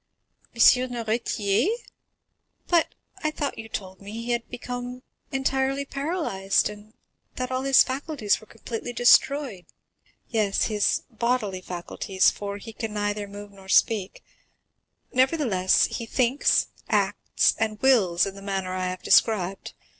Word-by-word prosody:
"M. 230 - -1 0.3
Noirtier? 225 - 0 1.0
But 340 -2 +2 0.3
I 310 - +2
thought 295 -4 -4
you 225 0 -8
told 190 -3 -6
me 200 +1 -9
he 230 +2 -4
had 235 -1 -2
become 245 0 -6 0.3
entirely 270 +1 0
paralyzed, 275 - 0
and 210 +2 -14 0.4
that 255 0 -3
all 255 0 -1
his 270 0 +6
faculties 265 -5 -1
were 220 - -16
completely 240 +1 -6
destroyed?" 245 - +3 0.6
"Yes, 215 -4 +1
his 210 -2 +1
bodily 225 -5 -1
faculties, 185 +2 0
for 200 0 -6
he 225 +2 -10
can 220 -1 -5
neither 205 0 -2
move 205 0 -10
nor 195 -1 -15
speak, 200 -1 +2 0.9
nevertheless 255 - +3
he 230 - -5
thinks, 255 +4 +2 0.2
acts, - - +2
and 215 -1 -1
wills 200 -10 +4
in 195 - -5
the 195 - -11
manner 195 -2 -3
I 185 0 -2
have 185 0 -5
described. 195 -4 +2
220 Hz, 130 wpm, -25 LUFS, 200-255 Hz, 1.0 s, his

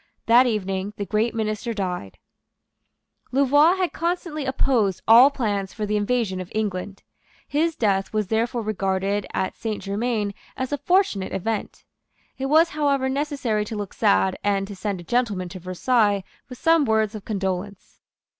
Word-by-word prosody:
That 245 +3 +6
evening 195 -2 -2
the 200 - -3
great 220 +3 0
minister 220 +1 -2
died. 180 - -4 1.1
Louvois 290 +6 +4
had 370 -2 -1
constantly 335 -3 -2
opposed 240 -8 +1
all 240 +5 +9
plans 205 -8 -2
for 215 - -3
the 210 +1 -1
invasion 210 -3 0
of 185 - -9
England. 200 -2 -3 0.4
His 320 +2 0
death 195 -3 0
was 215 -1 0
therefore 230 +1 0
regarded 195 -1 -1
at 190 - -2
Saint 220 -2 -4
Germains 205 0 -1 0.2
as 260 +1 -3
a 290 - -1
fortunate 355 - +1
event. 215 +2 -3 0.5
It 270 - -1
was 320 +4 +5
however 280 -4 0
necessary 270 -6 -1
to 220 - -6
look 205 -2 -5
sad, 95 0 +2
and 195 -1 +1
to 200 - -7
send 200 -1 -3
a - - -9
gentleman 205 -3 -1
to 185 +1 -8
Versailles 200 +3 +1 0.3
with 250 - -9
some 330 +1 +4
words 220 -3 +1
of 215 -2 -7
condolence. 195 -1 -4
215 Hz, 155 wpm, -23 LUFS, 195-260 Hz, 1.1 s, all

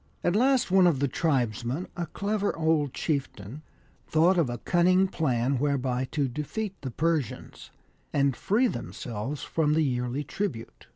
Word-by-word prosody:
At 175 - +2
last 255 -2 +3
one 190 -1 +6
of 165 -5 +3
the 140 +2 +1
tribesmen, 130 - -1
a 170 -1 -3
clever 205 +3 -2
old 160 -3 +1
chieftain, 135 - -3 0.5
thought 165 +4 +4
of 155 -7 +2
a 120 - -3
cunning 185 +7 +3
plan 130 -6 0
whereby 130 -3 0
to 140 +1 -1
defeat 150 - -4
the 135 - -4
Persians, 155 -1 -2 0.4
and 140 -2 +2
free 215 - +1
themselves 130 - -4
from 150 -2 +1
the 160 - +3
yearly 125 +1 -1
tribute. 155 - -5
150 Hz, 150 wpm, -27 LUFS, 130-175 Hz, 0.5 s, one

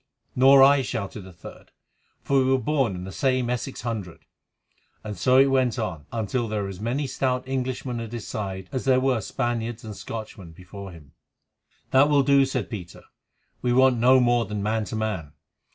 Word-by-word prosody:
"Nor 135 +1 +7
I," 140 0 +6
shouted 100 -4 -5
a - - -11
third, 85 - -13 0.5
"for 140 -1 +2
we 130 - +2
were 130 0 +3
born 130 -5 0
in 90 - -6
the 95 - -7
same 130 +6 0
Essex 125 -3 -4
hundred." 105 -7 -5 0.8
And 105 -1 -6
so 130 +4 +3
it 135 - +7
went 130 -3 +1
on, 90 -11 -4
until 115 +1 -2
there 105 -1 -2
were 100 - -4
as 95 -2 -8
many 125 +7 -2
stout 130 -1 -2
Englishmen 130 -2 -3
at 115 -1 -6
his 120 -3 -6
side 95 -3 -5
as 130 - -3
there 130 -1 +4
were 130 -3 +1
Spaniards 120 +1 -3
and 105 -2 -7
Scotchmen 105 -7 -8
before 95 +3 -10
him. 75 -5 -15 0.8
"That 135 +2 +5
will 145 -2 +4
do," 140 0 +4
said 125 -7 -3
Peter, 90 -5 -8 0.6
"we 125 - +1
want 130 -1 +4
no 130 +3 +6
more 120 -1 +2
than 105 -1 -4
man 110 +1 0
to 110 - -6
man. 105 -9 -3
120 Hz, 190 wpm, -25 LUFS, 105-130 Hz, 0.8 s, Nor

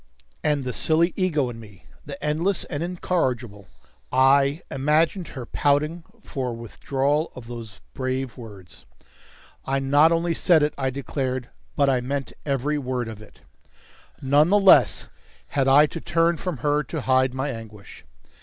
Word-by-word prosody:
And 150 -2 +1
the 125 -1 -4
silly 165 +2 +2
ego 155 -8 +1
in 115 - -10
me 105 -4 -15 0.2
the 140 -1 -8
endless 165 +6 0
and 145 -3 -5
incorrigible 130 - -2 0.4
I 140 +4 +3
imagined 155 +6 +1
her 130 -4 -8
pouting 150 +6 0 0.2
for 135 -4 -4
a - - -4
withdrawal 135 +6 -1
of 125 - -9
those 115 -3 -9
brave 130 -1 -3
words. 105 -7 -12 0.8
"I 135 +1 -1
not 145 +4 +4
only 170 0 +1
said 165 -2 +3
it," 150 - 0
I 135 -1 -1
declared, 130 -2 -3 0.3
"but 140 - +3
I 130 -2 +2
meant 135 +2 -4
every 140 +2 0
word 125 -3 -3
of 110 -1 -8
it." 110 - -17 0.8
None 145 +4 +4
the 205 - +5
less 195 -1 +5 0.4
had 135 -1 0
I 140 +3 +7
to 165 +2 -7
turn 170 0 +1
from 180 -4 -4
her 145 0 +2
to 155 0 -5
hide 130 0 +2
my 135 +2 -2
anguish. 110 -4 -11
140 Hz, 155 wpm, -24 LUFS, 125-155 Hz, 0.8 s, I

